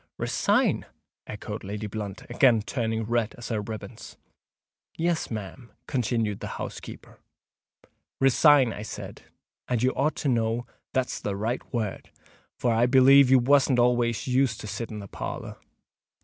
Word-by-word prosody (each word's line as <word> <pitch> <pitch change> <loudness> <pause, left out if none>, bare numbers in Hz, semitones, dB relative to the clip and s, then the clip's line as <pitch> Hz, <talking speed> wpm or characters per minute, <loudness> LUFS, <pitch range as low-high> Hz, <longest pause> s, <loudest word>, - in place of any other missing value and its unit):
"Resign!" - - +1 0.4
echoed 105 0 -6
Lady 105 +2 -5
Blunt, 105 -2 -6
again 120 -3 +3
turning 115 -2 -2
red 115 0 -1
as 120 -1 -8
her 110 -3 -1
ribands. 110 +2 -8 0.8
"Yes, 170 0 0
ma'am," 110 +2 -7
continued 115 -5 -1
the - - -6
housekeeper; - - -8 1.0
"resign 135 -1 +5
I - - -7
said; 110 - -8 0.5
and 120 -2 0
you 130 - +3
ought 145 +3 0
to - - -3
know 115 -1 0 0.3
that's 130 -1 -1
the 100 - -2
right 110 +5 -2
word—for 115 +1 -4
I 115 +2 +3
b'lieve 135 +1 +7
you 130 - +7
wasn't 135 +1 +4
always 120 -1 +2
used 130 -3 +1
to - - -8
sit 105 +4 -5
in 105 -1 -6
the 100 - -9
parlour." - - -6
120 Hz, 140 wpm, -26 LUFS, 110-130 Hz, 1.0 s, b'lieve